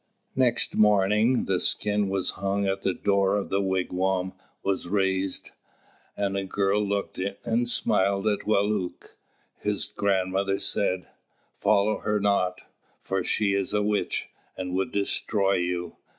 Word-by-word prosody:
Next 125 -2 +2
morning, 105 +3 +3
the 95 -2 +1
skin 105 -1 +1
which 95 -1 0
hung 100 +1 -1
at 95 0 -1
the 95 - +1
door 100 0 +2
of 100 - -2
the 100 - +1
wigwam 95 0 0 0.3
was 95 -2 -1
raised, 95 0 0 0.7
and 100 -1 -1
a 100 - -1
girl 100 +1 +1
looked 100 -2 -2
in 100 +1 -2
and 120 +1 +1
smiled 100 -3 +1
at 105 -1 +2
Wālūt. 105 -3 -1 0.5
His 105 0 0
grandmother 95 -1 0
said, 95 -2 0 0.5
"Follow 105 +1 +2
her 105 0 0
not, 100 -3 +1 0.4
for 95 -1 -2
she 100 +1 +1
is 100 0 -1
a 105 - +2
witch, 105 0 -1 0.3
and 90 -1 -4
would 95 +7 -1
destroy 100 0 +1
you." 90 0 -3
100 Hz, 140 wpm, -26 LUFS, 95-105 Hz, 0.7 s, morning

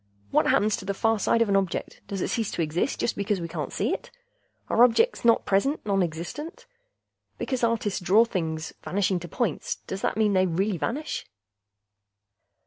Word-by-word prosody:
What - - +3
happens 210 +1 +3
to 195 - -8
the 200 0 -2
far 225 +1 +2
side 230 +3 +3
of - - -4
an 200 - +3
object; 195 -3 -1
does 195 -2 -4
it - - -1
cease 225 -4 -1
to 170 - 0
exist 160 - -1
just - - 0
because 200 -1 -1
we 170 - -4
can't 165 -2 -4
see - - 0
it? - - -5 0.6
Are 235 - +5
objects 250 - +3
not 230 -1 +4
present 205 +9 +2
nonexistent? 195 - -2 0.7
Because 260 -3 -2
artists 225 -4 +1
draw 205 +5 +5
things 160 -7 -3
vanishing 190 -1 0
to 175 - -8
points, 210 - -2
does 190 - -5
that - - -1
mean 215 -2 +3
that 190 - +4
they 185 - +3
really 185 +2 0
vanish?" 295 +6 -3
200 Hz, 185 wpm, -26 LUFS, 180-230 Hz, 0.7 s, Are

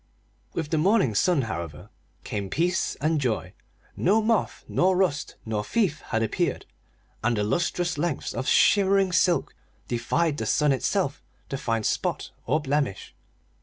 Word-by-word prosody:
With 160 -3 -3
the 160 - +2
morning 190 - +3
sun, 150 - +2
however, 85 -1 -6 0.3
came 100 -2 -4
peace 175 - 0
and 155 0 0
joy. 120 -5 -1 0.4
No 205 +5 +3
moth 220 0 0
nor 185 0 +2
rust 175 -7 0
nor 110 -2 -2
thief 165 - 0
had 110 -1 0
appeared, 155 - -1 0.6
and 120 0 +1
the 105 - +1
lustrous 170 +7 0
lengths 165 -3 -2
of 130 +3 -3
shimmering 195 -1 +4
silk 180 0 +2 0.3
defied 145 +6 0
the 110 - -3
sun 150 +4 +3
itself 145 +1 0 0.3
to - - -3
find 115 -3 -1
spot - - -1 0.2
or 155 - +2
blemish. 140 - -2
150 Hz, 145 wpm, -26 LUFS, 115-180 Hz, 0.6 s, shimmering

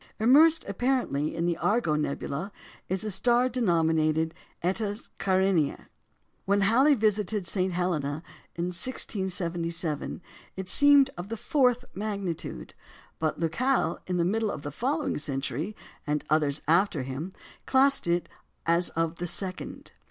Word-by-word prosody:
Immersed 305 +8 +5
apparently 200 - 0
in 170 - -1
the 170 -1 0
Argo 205 -5 +1
nebula 150 +4 -2 0.4
is 190 +3 -1
a 215 - -3
star 240 +5 +3
denominated 160 -8 +1 0.3
Eta 205 +3 -1 0.2
Carinæ. 190 -5 +1 0.6
When 200 +1 +2
Halley 260 +9 +5
visited 210 -3 0
St. 185 +1 0
Helena 165 -4 -1 0.3
in 170 +1 -2
1677, 175 - -2 0.4
it 190 -1 -6
seemed 285 +3 +6
of 180 +3 -6
the 230 - -4
fourth 250 -1 +2
magnitude; 195 - -4 0.5
but 155 -1 -1
Lacaille 240 +12 0
in 180 -1 -1
the 170 - +2
middle 220 +4 0
of 150 - -5
the 145 - -5
following 275 - -1
century, 145 - -3 0.3
and 150 0 0
others 150 -2 +1
after 170 -3 +2
him, 135 +8 -5 0.4
classed 275 -4 +3
it 170 0 +1 0.4
as 170 +1 +2
of 165 0 0
the 175 - -3
second. 185 +2 -5
185 Hz, 130 wpm, -27 LUFS, 165-220 Hz, 0.6 s, seemed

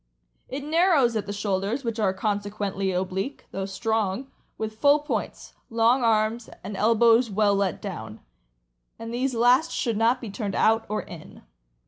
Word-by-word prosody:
It 275 +2 -5
narrows 310 -6 +3
at 210 -2 -2
the - - -3
shoulders, 205 +5 -2
which 230 -1 -3
are 200 -3 +2
consequently 200 -1 -2
oblique, 190 +8 -3
though 195 0 -4
strong, 220 +4 -2 0.3
with 220 0 -5
full 285 +3 +5
points, 295 +1 -5 0.2
long 230 +3 +3
arms, 225 +1 +1
and 200 +2 -6
elbows 230 +3 +4
well 205 0 +2
let 195 -2 0
down, 110 - -6 0.8
and 230 +1 -7
these 255 +1 -1
last 250 +7 +4
should 230 -5 -1
not 230 +3 +3
be 230 -5 -7
turned 200 -1 -4
out 225 +1 +2
or 215 - -2
in. 170 -3 -12
220 Hz, 155 wpm, -25 LUFS, 200-240 Hz, 0.8 s, full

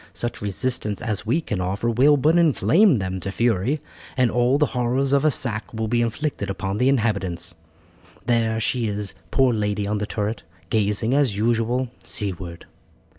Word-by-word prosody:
Such 120 - -5
resistance 105 0 -2
as 110 -2 -3
we 145 +9 +2
can 105 - -3
offer 95 +5 -2
will 140 +6 +5
but 155 +5 +3
inflame 170 - +4
them 95 -2 -3
to 100 - -4
fury, 115 +6 0 0.4
and 125 -2 +3
all 125 +3 +3
the 150 - +3
horrors 125 +2 0
of 140 - +3
a 155 - +5
sack 120 -5 -1
will 110 0 -2
be 120 +2 +1
inflicted 120 -2 -2
upon 95 +1 -3
the 130 - +4
inhabitants. 100 -9 -1 0.7
There 115 -2 +1
she 115 +2 0
is, 105 -1 -3 0.2
poor 130 -2 +3
lady, 105 -1 -1
on 105 +1 -1
the 105 - -3
turret, 105 0 -3 0.3
gazing, 110 +2 +1
as 135 -8 +2
usual, 120 +3 0
seaward." 90 -4 -5
115 Hz, 170 wpm, -23 LUFS, 105-130 Hz, 0.7 s, will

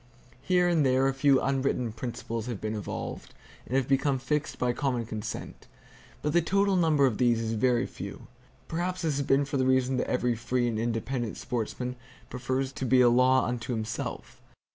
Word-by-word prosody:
Here 180 +5 +3
and 170 -4 +3
there, 130 0 +3
a 135 - +1
few 135 0 +4
unwritten 135 -3 0
principles 115 0 -5
have 120 -5 -4
been 110 0 -3
evolved, 105 -3 -6 0.3
and 130 - -2
have 135 -2 +2
become 135 0 +2
fixed 150 +3 -2
by 125 -1 +1
common 125 -3 -1
consent; 110 -1 -6 0.6
but 150 - 0
the 175 - +5
total 195 +3 +2
number 160 -5 +4
of 120 -6 0
these 120 -2 +3
is 115 0 -2
very 120 +2 +2
few. - - -8 0.4
Perhaps 180 +2 -2
this 155 -4 0
has 140 - -1
been 140 +1 +3
for 140 0 -2
the 130 -1 +2
reason 130 0 +2
that - - -1
every 125 -1 +1
free 120 +2 0
and 110 -2 -1
independent 120 +1 -2
sportsman 125 +1 -3 0.3
prefers 130 +1 -2
to 135 - -4
be 130 +1 +5
a 120 - +6
law 130 +2 +4
unto 125 0 -3
himself. 110 -1 -5
130 Hz, 185 wpm, -28 LUFS, 120-140 Hz, 0.6 s, a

